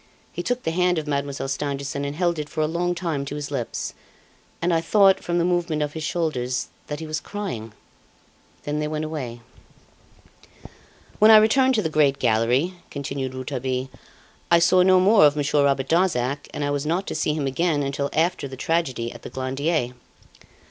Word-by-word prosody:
He - - -4
took 245 0 -2
the 160 - -1
hand 180 +1 +2
of 155 - -2
Mademoiselle 140 -2 -2
Stangerson 140 0 -3
and 140 +1 -4
held 170 -1 0
it 150 0 -5
for 155 - -3
a - - +3
long 175 +2 -1
time 165 -5 -2
to 145 - -5
his 145 -1 -5
lips, 125 -5 -3 0.7
and 175 +1 +1
I 165 - +2
thought, 195 +2 +4
from 175 0 -1
the 170 - +2
movement 175 -4 0
of 150 0 -4
his 160 - -5
shoulders, 140 -7 -2 0.2
that 150 0 -4
he 160 - -6
was 155 0 -3
crying. 185 - -6 0.9
Then 150 +1 -2
they 150 - -1
went 155 0 -3
away. 130 -7 -5 1.8
"When 215 - +7
I 220 - +10
returned 260 +5 +4
to 215 - +1
the - - +1
great 145 -3 +3
gallery," 120 +9 +2 0.2
continued 135 -2 -4
Rouletabille, 130 0 -3 0.6
"I 170 - +6
saw 180 +2 +4
no 185 0 +5
more 200 0 +5
of 145 0 +4
Monsieur 145 0 +2
Robert 135 -1 +1
Darzac, 145 -6 +1
and 150 - -4
I 145 - -1
was 145 -1 -1
not 175 +5 0
to - - -4
see 155 -1 0
him 150 -3 -2
again 145 +2 0
until 140 +1 -2
after 165 -2 0
the 130 0 -9
tragedy 130 -7 -1
at 120 - -11
the - - -8
Glandier. 130 +1 -1
150 Hz, 190 wpm, -23 LUFS, 135-175 Hz, 1.8 s, I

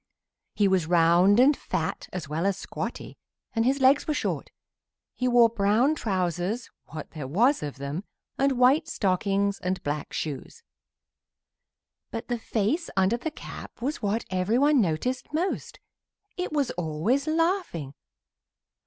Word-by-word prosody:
He 205 - +3
was 185 -4 +2
round 175 +4 +5
and 280 +4 +6
fat, - - -3
as 175 -5 -5
well 160 +6 -1
as 200 -1 0
squatty, - - -6 0.3
and 225 0 +1
his 270 +2 +2
legs 270 +2 +4
were 305 - 0
short. - - -2 0.6
He 250 - -1
wore 240 -1 +6
brown 225 +6 +2
trousers 190 - -2 0.2
(what 155 -2 -8
there 150 -5 -6
was 235 - +3
of 145 -2 -5
them) 140 +6 -4 0.3
and 275 0 +2
white 255 +5 +4
stockings 200 +1 0
and 185 +1 -2
black 145 0 -3
shoes. 155 - -5 1.5
But 230 +1 -6
the 240 -1 -1
face 225 - -1
under 190 +5 +3
the 320 - -3
cap 310 - -10
was 280 +7 -3
what 210 +2 -1
everyone 240 +10 +3
noticed 220 - -1
most; 350 +5 -2 0.6
it 360 -2 -3
was 290 -4 0
always 175 - -1
laughing. 325 - 0
210 Hz, 140 wpm, -26 LUFS, 175-265 Hz, 1.5 s, and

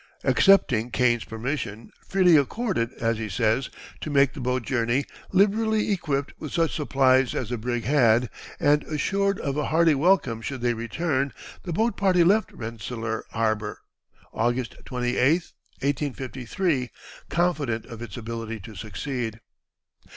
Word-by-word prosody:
Accepting 125 - +4
Kane's 120 -2 +2
permission, 115 -1 -4 0.2
freely 185 -3 +5
accorded, 145 - +1
as 115 -3 -1
he 110 -1 -4
says, 110 +6 +1 0.3
to - - -5
make 140 -2 +3
the 145 - -8
boat 125 -1 -1
journey, 120 +3 0 0.3
liberally 215 +2 +2
equipped 145 -7 -1
with 155 - -6
such 165 -2 +1
supplies 135 -4 +3
as 120 - -2
the 120 - -2
brig 120 +1 -2
had, 125 -3 +4 0.3
and 150 -2 +4
assured 195 +6 0
of 140 0 -2
a 150 - 0
hearty 165 0 +4
welcome 140 -7 +2
should 130 +1 -5
they 120 0 +2
return, 135 +4 -1 0.3
the 175 - -6
boat 220 +5 0
party 185 -3 +4
left 205 +6 +3
Rensselaer 115 0 -5
Harbor, 110 -2 -2 0.5
August 120 +2 -1
28, 125 +2 +2 0.5
1853, 135 +1 -1 0.4
confident 145 -10 0
of 115 -1 -10
its 115 -3 -7
ability 115 -1 -5
to 110 +2 -10
succeed. 110 - -4
130 Hz, 135 wpm, -25 LUFS, 115-155 Hz, 0.5 s, freely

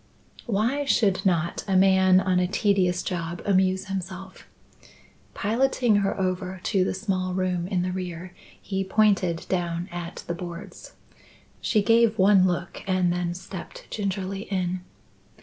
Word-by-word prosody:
Why 235 +7 +1
should 205 -8 +2
not 170 -2 0
a 195 - +1
man 190 -1 +5
on 185 -1 +1
a 180 - +1
tedious 190 -2 +1
job 170 -1 -3
amuse 190 -1 +2
himself? 190 0 -7 0.9
Piloting 235 0 +2
her 200 -1 0
over 185 0 -2
to 195 -4 +2
the 185 - -1
small 185 -2 -2
room 180 -2 -1
in 185 -2 0
the 180 - -2
rear, 180 -1 -6 0.3
he 195 -1 -3
pointed 190 -4 +2
down 175 -1 -2
at 175 0 -6
the 170 - -3
boards. 170 +1 -9 0.7
She 210 -3 +2
gave 230 0 +4
one 190 -1 +5
look 175 -1 -3
and 185 -2 +2
then 175 -1 -2
stepped 185 0 -9
gingerly 195 -1 -3
in. 185 -1 -1
185 Hz, 140 wpm, -25 LUFS, 180-195 Hz, 0.9 s, man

